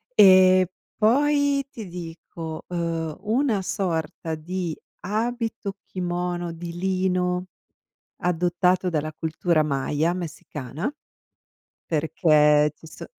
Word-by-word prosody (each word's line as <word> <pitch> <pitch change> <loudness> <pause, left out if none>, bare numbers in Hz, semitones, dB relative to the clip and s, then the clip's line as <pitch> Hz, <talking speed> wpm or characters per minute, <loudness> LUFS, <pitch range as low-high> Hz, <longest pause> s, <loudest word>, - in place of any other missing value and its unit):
Ehm, 185 -2 +7 0.3
poi 285 +4 +3
ti 225 -6 -8
dico, 165 -2 -7
uhm, 165 -3 -2
una 225 0 +1
sorta 165 -4 -2
di 170 +1 -4 0.2
abito-kimono 190 -5 -3
di 170 +1 -7
lino, 180 -1 0 0.7
adottato 180 +1 +1
dalla 155 -2 -1
cultura 160 +1 +1
Maya 150 +3 0
messicana, 160 - -5 0.9
perché 150 -1 +4
ci 160 - -16
so 160 - -10
175 Hz, 85 wpm, -24 LUFS, 160-190 Hz, 0.9 s, Ehm